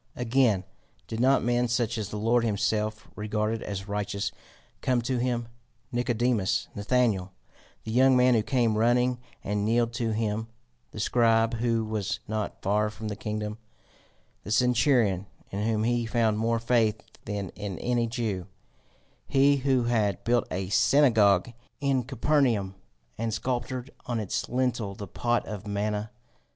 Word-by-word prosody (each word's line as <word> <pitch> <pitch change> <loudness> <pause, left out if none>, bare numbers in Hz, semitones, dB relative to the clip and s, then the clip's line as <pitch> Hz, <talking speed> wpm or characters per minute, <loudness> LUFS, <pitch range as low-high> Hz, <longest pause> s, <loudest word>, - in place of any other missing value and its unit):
Again, 120 -5 +2 0.4
did 110 - -5
not 130 +3 +4
men 120 0 +2
such 120 -1 0
as 105 - -4
the 105 - -5
Lord 115 +3 +2
himself 110 0 -1
regarded 105 +1 -1
as 100 -1 -5
righteous 100 0 -2 0.5
come 125 -2 +2
to 125 +1 -1
him 120 -1 -1 0.4
Nicodemus, 120 -4 0
Nathaniel, 100 -4 +1 0.5
the 110 - -5
young 130 +2 +5
man 125 0 +5
who 115 - +3
came 115 -2 +1
running 125 +2 +2 0.2
and 105 0 -1
kneeled 115 +2 +1
to 115 -1 -1
him, 110 0 -1 0.4
the - - -9
scribe 115 -1 +3
who 115 -1 0
was 105 -2 -2
not 110 -1 -4
far 105 +2 +2
from 110 0 -6
the 105 - -4
kingdom, 105 -1 -4 0.8
the - - -8
centurion, 115 -4 +3 0.2
in 100 - -3
whom 110 -1 +1
he 120 0 +1
found 110 -2 +1
more 115 +1 +1
faith 115 -2 +1 0.2
than 100 -2 -3
in 100 -2 -6
any 120 -1 0
Jew, 110 -7 -3 0.8
he 140 +1 +4
who 130 -2 +2
had 110 -5 0
built 120 0 +2
a 95 0 -3
synagogue 110 -5 +4 0.3
in 140 -2 +1
Capernaum, 130 -8 +1 0.5
and 115 0 -1
sculptured 125 +2 -3 0.2
on 120 -2 -1
its 105 -4 -3
lintel 120 -5 -1
the 100 - -6
pot 120 +5 -1
of 105 -1 -7
manna? 105 +1 -2
115 Hz, 145 wpm, -27 LUFS, 105-120 Hz, 0.8 s, young